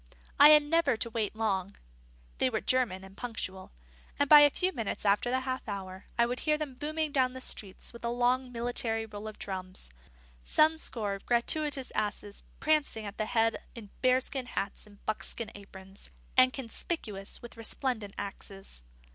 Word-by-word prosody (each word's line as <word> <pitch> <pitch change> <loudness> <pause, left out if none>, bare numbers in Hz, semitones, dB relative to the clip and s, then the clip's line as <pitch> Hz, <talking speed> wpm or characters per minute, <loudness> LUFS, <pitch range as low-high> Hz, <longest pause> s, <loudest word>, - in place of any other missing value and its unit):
I 290 - +10
had 300 -1 +8
never 295 -5 +2
to 230 +1 0
wait 220 -2 -1
long 200 -3 -1 0.6
they - - +3
were - - -1
German 235 -8 +1
and 190 0 -13
punctual 200 -6 -6 0.5
and 285 - +2
by 300 +1 +10
a 290 0 +8
few 365 +6 0
minutes 225 -5 -3
after 205 +4 +3
the 260 +1 +1
half 260 -1 -4
hour, 190 -1 -6
I 235 - +5
would 245 +1 -3
hear 305 -1 +1
them 300 -3 -4
booming 305 +3 -2
down 260 -2 +1
street 195 -6 -2
with 235 - -12
a 235 - 0
long 245 +1 +1
military 230 -2 -1
roll 210 0 -8
of 215 - -8
drums, 185 - -5 0.5
some 315 - +3
score 215 -9 -2
of 195 - -9
gratuitous 270 +3 +2
asses 205 -1 -3 0.2
prancing 300 -8 +1
at 200 0 -8
the 215 - 0
head 225 -1 +2 0.2
in 215 -4 -10
bearskin 255 0 +1
hats 200 -2 -4
and 205 -1 -19
buckskin 215 +1 -3
aprons, 195 -1 -10 0.3
and 255 0 +7
conspicuous 225 - -3
with 240 - -10
resplendent 225 -2 -2
axes. 195 - -7
235 Hz, 170 wpm, -30 LUFS, 205-260 Hz, 0.6 s, I